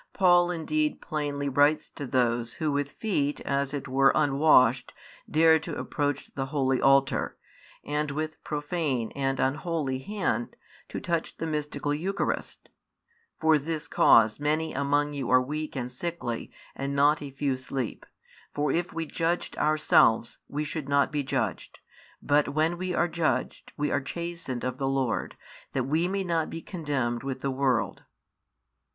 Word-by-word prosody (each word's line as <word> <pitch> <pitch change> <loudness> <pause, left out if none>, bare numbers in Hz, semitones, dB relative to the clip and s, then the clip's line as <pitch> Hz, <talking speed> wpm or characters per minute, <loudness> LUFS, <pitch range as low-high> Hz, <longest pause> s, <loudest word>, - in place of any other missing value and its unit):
Paul 175 -2 +5
indeed 155 -3 -1
plainly 145 -2 -3
writes 145 +3 +3
to 140 - -6
those 120 -2 +1
who 155 -2 -1
with 140 0 -2
feet 145 -10 -1
as 140 0 -1
it 145 -2 -4
were 135 +1 +4
unwashed 135 -4 +4 0.4
dared 160 0 +5
to - - -5
approach 145 -2 -2
the 135 -1 -3
holy 135 -2 +1
altar, 135 0 +3 0.5
and 150 0 -1
with 155 +2 -4
profane 145 -6 -2
and 135 -1 -1
unholy 145 -1 -1
hand 185 - -2 0.3
to - - -4
touch 170 -2 -2
the - - -3
mystical 150 -2 -2
Eucharist: 185 +7 -3 0.7
For 160 -1 +4
this 155 +1 -4
cause 110 0 +5
many 155 +2 0
among 145 +1 +1
you 140 -4 -3
are 130 - +6
weak 150 +4 -4
and 125 -1 -3
sickly, 125 -4 -4 0.2
and 140 +1 -3
not 145 +2 +4
a 145 - -6
few 135 0 -1
sleep. 130 -1 -5 0.5
For 145 -1 +1
if 175 +3 -1
we 165 0 -3
judged 165 +2 -2
ourselves, 150 -7 +3
we 150 +1 -3
should 150 -1 -5
not 140 -1 +3
be 150 -1 0
judged. 135 - -3 0.5
But 145 0 +3
when 160 +2 +2
we 185 -1 -2
are 175 - +2
judged, 155 -7 -2
we 150 0 0
are - - +1
chastened 170 -4 -5
of 125 +1 -3
the 135 - 0
Lord, 135 -4 -1 0.4
that 130 - 0
we 155 +7 +1
may 195 +1 -1
not 165 -3 0
be 165 - -7
condemned 140 -9 -2
with 135 -1 -4
the 135 - -1
world. 130 -3 0
145 Hz, 155 wpm, -27 LUFS, 135-160 Hz, 0.7 s, are